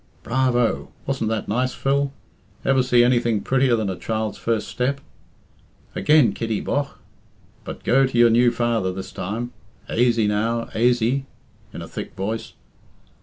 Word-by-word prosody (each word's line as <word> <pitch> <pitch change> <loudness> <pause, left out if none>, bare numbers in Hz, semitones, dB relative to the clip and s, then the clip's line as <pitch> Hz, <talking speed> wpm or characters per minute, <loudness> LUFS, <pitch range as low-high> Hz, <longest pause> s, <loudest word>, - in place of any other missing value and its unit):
"Bravo! 125 -1 +1 0.2
Wasn't 130 -5 -1
that 110 -1 -2
nice, 125 +4 0
Phil? 140 0 0 0.5
Ever 135 -1 +4
see 125 -1 +4
anything 120 -3 +2
prettier 130 0 +2
than 110 -2 -1
a 95 - -2
child's 110 +1 -3
first 115 -2 -1
step? 140 +3 -1 0.9
Again, 150 -4 +4
Kitty, 110 -2 -2
bogh! 140 -1 -2 0.7
But - - -8
go 135 +3 +4
to 130 - -3
your 120 -1 +6
new 120 +2 +5
father 115 -5 0
this 95 +1 -7
time. 115 +6 -4 0.3
Aisy, 115 -2 +2
now, 115 +3 0
aisy!" 120 +3 +1 0.4
(in - - -7
a - - -8
thick - - -7
voice). 110 +4 -4
120 Hz, 145 wpm, -22 LUFS, 110-130 Hz, 0.9 s, your